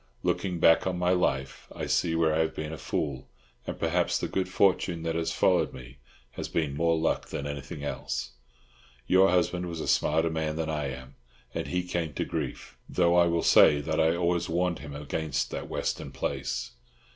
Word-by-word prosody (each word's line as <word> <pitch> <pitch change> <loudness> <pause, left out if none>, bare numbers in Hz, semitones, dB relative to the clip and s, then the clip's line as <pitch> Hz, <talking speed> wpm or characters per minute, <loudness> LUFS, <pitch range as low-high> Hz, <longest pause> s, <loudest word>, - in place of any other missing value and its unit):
Looking 90 -3 0
back 80 +3 +5
on 90 -1 -1
my 90 0 +2
life, 70 -7 0
I - - -3
see 80 -2 +1
where 80 -1 +2
I 80 - +1
have 80 -1 0
been 80 0 -4
a - - -6
fool; 65 0 -3 0.4
and - - -4
perhaps - - +1
the - - -2
good 95 -1 -2
fortune 90 -3 +2
that 80 0 -1
has 80 0 -1
followed - - +2
me 65 +2 -12 0.3
has - - -5
been 75 -4 -1
more 85 +2 +2
luck 80 - 0
than 70 - -5
anything 70 0 -6
else. 75 - -3 0.7
Your 95 +4 +5
husband 90 0 +1
was 85 -2 -5
a - - -4
smarter 80 +2 +2
man 80 -1 -2
than 80 0 -2
I 75 -2 -2
am, 65 0 -8 0.4
and - - -3
he 90 0 -1
came 85 -3 -3
to - - -1
grief, - - -5
though 85 -1 +3
I 85 -1 +5
will 85 -1 +1
say 75 - +6
that 80 +2 -2
I 80 +1 +3
always 85 0 0
warned 85 +1 0
him 70 -2 -8
against 75 0 -2
that - - -5
Western - - -3
place. - - -3
80 Hz, 195 wpm, -28 LUFS, 75-85 Hz, 0.7 s, say